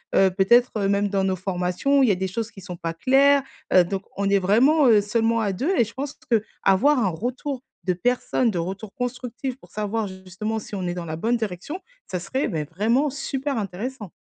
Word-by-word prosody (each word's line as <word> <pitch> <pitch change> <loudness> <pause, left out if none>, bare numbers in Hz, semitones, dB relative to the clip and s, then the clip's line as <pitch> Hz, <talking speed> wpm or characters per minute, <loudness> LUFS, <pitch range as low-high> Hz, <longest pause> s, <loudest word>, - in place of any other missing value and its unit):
heu, 190 -1 +5
peut-être 210 +2 +3
même 200 0 +1
dans 195 -1 +1
nos 190 -1 +1
formations. 185 +9 0
Il 260 - +5
y - - +4
a - - -1
des 190 +1 -2
choses 225 +3 -3
qui 195 - -13
sont 180 -2 -7
pas 165 0 -3
claires, 275 +7 +4 0.3
heu, 185 -1 +7
donc 195 +2 -4
on 200 0 0
est 200 - +4
vraiment, 255 +10 +4
heu, 215 -3 +6
seulement 225 +2 +1
à 205 - 0
2, 280 - 0
et 235 - +5
je 225 - -8
pense 280 +2 -5
qu'avoir 220 +4 +2
un 200 -5 +2
retour 250 - -4 0.2
de 185 - +1
personnes 245 +4 +1
de 180 - -3
retour 195 +4 -4
constructif 250 +1 -4
pour - - -19
savoir 215 0 -2
justement 190 +4 -5
si 210 - -12
on 185 -2 -3
est 175 - -1
dans 175 -1 -5
la 155 - -4
bonne 230 +7 +1
direction, 220 - -4 0.3
ça 180 - -3
serait 260 +8 -1
mais 155 -2 -2
vraiment 225 - +1
super 275 -1 -3
intéressant. 210 +2 -5
210 Hz, 215 wpm, -24 LUFS, 190-250 Hz, 0.3 s, heu